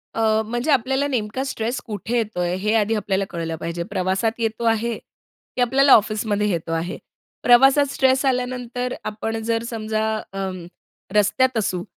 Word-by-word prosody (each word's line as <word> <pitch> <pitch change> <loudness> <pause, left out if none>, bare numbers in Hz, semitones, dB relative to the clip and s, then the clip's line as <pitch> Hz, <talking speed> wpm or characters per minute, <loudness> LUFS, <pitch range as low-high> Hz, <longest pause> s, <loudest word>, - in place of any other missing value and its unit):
अ, 220 -1 +2
म्हणजे 240 +7 -1
आपल्याला 265 +2 +2
नेमका 250 -1 -2
स्ट्रेस 240 -2 -3
कुठे 225 +2 -3
येतो 215 -5 -2
आहे, 175 0 0
हे 210 +3 0
आधी 220 0 +2
आपल्याला 195 -2 -1
कळलं 165 -2 -4
पाहिजे. 170 +1 -4
प्रवासात 190 +4 0
येतो 225 0 -2
आहे, 225 0 +1 0.6
की 250 - -1
आपल्याला 270 +3 +5
ऑफिसमध्ये 210 -1 +2
येतो 165 -2 -2
आहे. 165 +2 -2 0.5
प्रवासात 270 +4 +6
स्ट्रेस 265 0 +2
आल्यानंतर 250 -1 -1
आपण 225 +1 -3
जर 230 0 0
समजा 220 -1 -2 0.3
अ, 195 -1 -2 0.7
रस्त्यात 230 +4 +3
असू, 180 -4 -1
225 Hz, 150 wpm, -22 LUFS, 205-250 Hz, 0.7 s, प्रवासात